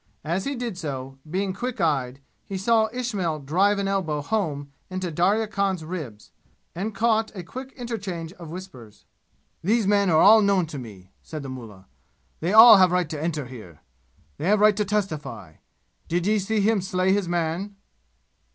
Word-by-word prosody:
As 170 +5 -2
he 280 - -2
did 235 -7 -5
so, 135 -4 -6
being 190 +3 -1
quick 240 +4 -5
eyed, 135 -6 0 0.3
he 195 - -4
saw 220 +3 +3
Ismail 210 -10 -2
drive 180 +9 +1
an 200 0 -1
elbow 165 -7 -1
home 145 -8 -2 0.2
into 185 -2 -4
Darya 195 +8 +2
Khan's 195 -5 -2
ribs, 150 - -7 0.4
an 200 +6 -3
caught 220 0 +1
a 185 - -6
quick 260 +8 -8
interchange 195 -9 -5
of 170 -4 -11
whispers. 140 - -11 0.6
"These 220 +4 +2
men 200 -1 +3
are 160 -2 +4
all 220 +4 +8
known 200 -3 +2
to 140 - -4
me," 100 -6 -11
said 155 -2 -7
the 135 - -7
mullah. 110 -7 -10 0.5
"They 170 +4 -1
all 220 0 +10
have 185 -1 +6
right 180 -3 0
to 150 -2 -4
enter 155 -3 -2
here. 105 - -12 0.6
They - - -2
have 210 +1 +4
right 210 0 +5
to 210 0 0
testify. 155 - -4 0.5
Did 175 +1 -1
ye 215 +1 +2
see 210 +2 0
him 215 0 +2
slay 185 0 +1
his 200 -3 0
man?" 175 +4 -2
185 Hz, 175 wpm, -24 LUFS, 155-205 Hz, 0.6 s, all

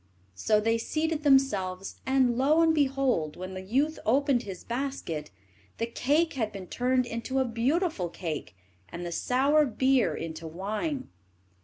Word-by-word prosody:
So 210 - +2
they 225 +2 +1
seated 315 +5 -1
themselves, 205 -10 +1
and, 260 -2 +3
lo 290 +6 +3
and 325 -1 +4
behold, 270 - +1
when 185 +1 -6
the 185 - -5
youth 275 +11 0
opened 270 +2 +2
his 190 -5 -8
basket, 235 - -4 0.5
the 230 - 0
cake 290 +8 +1
had 225 -6 -2
been 195 -2 -7
turned 255 +5 +1
into 235 +3 -4
a 265 - +3
beautiful 245 - 0
cake, 155 - -5 0.3
and 175 +1 -6
the 175 - -4
sour 275 - +3
beer 260 0 +2
into 160 0 -6
wine. 215 - -3
245 Hz, 150 wpm, -28 LUFS, 190-275 Hz, 0.5 s, and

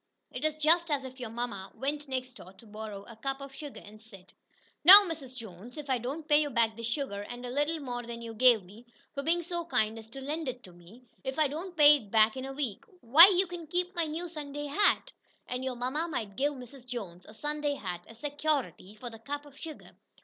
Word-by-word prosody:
It 250 - -6
is 310 -1 +1
just 325 +3 +3
as 285 -3 0
if 260 0 -9
your 245 -3 -5
mamma 225 -4 -5
went 290 +2 -3
next 255 -1 -3
door 190 -6 -13
to 230 - -18
borrow 210 -2 -8
a 230 - -12
cup 270 +4 -3
of 275 -1 -9
sugar, 290 0 -9
and 215 +1 -14
said: 195 -5 -15 0.5
"Now, 390 +6 +12
Mrs. 285 -6 -6
Jones, 225 - -10
if 290 -2 -5
I 255 - +2
don't 285 +7 -5
pay 295 0 +5
you 295 - -1
back 230 -3 +2
this 230 0 -5
sugar, 235 -5 -3
and 245 +4 -7
a 245 - -5
little 295 +4 0
more 245 -4 -4
than 235 0 -7
you 230 -1 -7
gave 235 -2 +5
me, 210 +7 -15 0.3
for 280 - -3
being 340 +4 +1
so 345 0 -3
kind 220 -9 0
as 220 - -12
to 235 +4 -10
lend 300 +3 -4
it 250 0 -7
to 185 - -12
me 175 +8 -16 0.2
if 265 0 -4
I 310 -1 +4
don't 335 +5 -6
pay 295 -1 +8
it 215 -7 -13
back 220 +1 +4
in 260 0 -5
a 270 - -5
week, 270 -8 -3 0.2
why 290 +10 +10
you 380 -1 +3
can 345 -2 -8
keep 360 +3 -1
my 340 -1 +1
new 325 +3 -4
Sunday 295 -3 -6
hat." 410 - +2 0.3
And 250 +1 -4
your 260 -1 -2
mamma 260 +7 -2
might 220 -11 -4
give 290 +6 +1
Mrs. 255 -1 -12
Jones 190 -8 -7
a 215 - -12
Sunday 295 +3 -2
hat 180 -8 -5
as 225 - -14
"security" 290 -7 -2
for 240 +2 -8
the 225 - -11
cup 290 +5 -5
of 285 -1 -15
sugar. 315 +1 -9
265 Hz, 240 wpm, -30 LUFS, 225-300 Hz, 0.5 s, Now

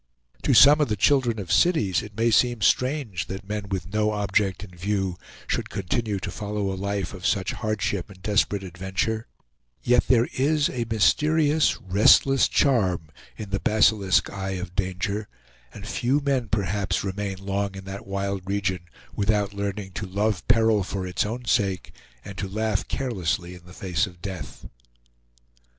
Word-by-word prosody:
To - - +2
some 145 +2 +8
of 150 - +3
the 110 - -1
children 120 +1 +2
of 100 -4 -5
cities 105 - +3
it 105 -1 -11
may 115 +1 +2
seem 120 0 +3
strange 125 - +1
that 95 +1 -7
men 105 -1 -4
with 95 0 -4
no 105 0 +1
object 100 -2 0
in 95 - -11
view 95 +1 -2 0.3
should - - -2
continue 105 +2 -2
to - - -4
follow 105 -1 -3
a - - -3
life 100 -1 -3
of 95 -2 -10
such 95 -2 +1
hardship 105 -4 -2
and 95 -2 -14
desperate 105 -1 +1
adventure; 95 +5 -3 0.6
yet 125 0 +3
there 120 -2 +4
is 150 +3 +2
a 120 -3 -3
mysterious, 150 - +3
restless 105 +8 +4
charm 95 - +1 0.3
in 105 -3 -7
the 100 - 0
basilisk 105 -3 +3
eye 95 -1 -4
of 90 -1 -6
danger, 100 +3 -2 0.4
and 100 - -10
few 130 +5 +1
men 135 -4 0
perhaps 100 -2 -1
remain 100 0 -3
long 100 0 -3
in 95 - -8
that 95 +1 -8
wild 100 0 -2
region 95 -2 -1 0.4
without 105 -1 +1
learning 100 -1 -4
to 95 +1 -5
love 100 0 -1
peril 115 -3 +4
for 95 0 -4
its 90 +3 -1
own 120 +3 -5
sake, 100 -7 0 0.3
and 100 -1 -8
to 95 - -2
laugh 110 0 -1
carelessly 95 - -2
in 90 -1 -14
the - - -13
face 95 -3 -1
of 90 -2 -14
death. 90 -5 -7
100 Hz, 165 wpm, -25 LUFS, 95-110 Hz, 0.6 s, some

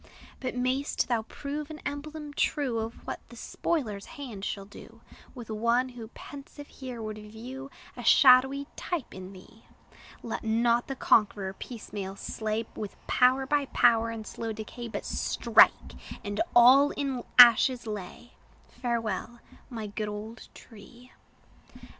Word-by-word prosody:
But 255 -1 -4
may'st 255 +3 0
thou 235 -2 +1
prove 290 +6 -6
an 310 - -7
emblem 295 +1 -6
true 275 -5 0
Of 225 +1 -4
what - - -4
the - - -12
spoiler's 220 -12 -3
hand 240 -9 -7
shall 200 -1 -4
do 200 - -14 0.3
With 235 -3 -8
one, 235 +4 +1
who 240 -3 -9
pensive 285 +1 -10
here 255 -4 -8
would 215 0 -5
view 240 +6 -9 0.3
A 245 - -8
shadowy 265 +3 +6
type 340 -8 -4
in 185 0 -9
thee! 210 +4 -16 0.6
Let 230 - -4
not 235 +2 +2
the 270 - -4
conqueror 205 -6 +2
piecemeal 200 -3 -7
slay, 220 +2 -3
With 210 -2 -6
power 260 +1 +3
by 285 +1 +1
power 230 -2 +3
in 225 -1 -6
slow 225 +1 -5
decay; 220 +2 -7
But 225 - -5
strike, - - +3 0.3
and 205 0 -2
all 260 +4 +8
in 270 -5 -3
ashes 245 +1 +8
lay! 210 +2 -7 0.4
Farewell, 235 -2 -3 0.3
my 225 -4 -5
good 210 +1 -4
old 215 +2 -8
tree! 240 +3 -15
235 Hz, 140 wpm, -28 LUFS, 215-265 Hz, 0.6 s, all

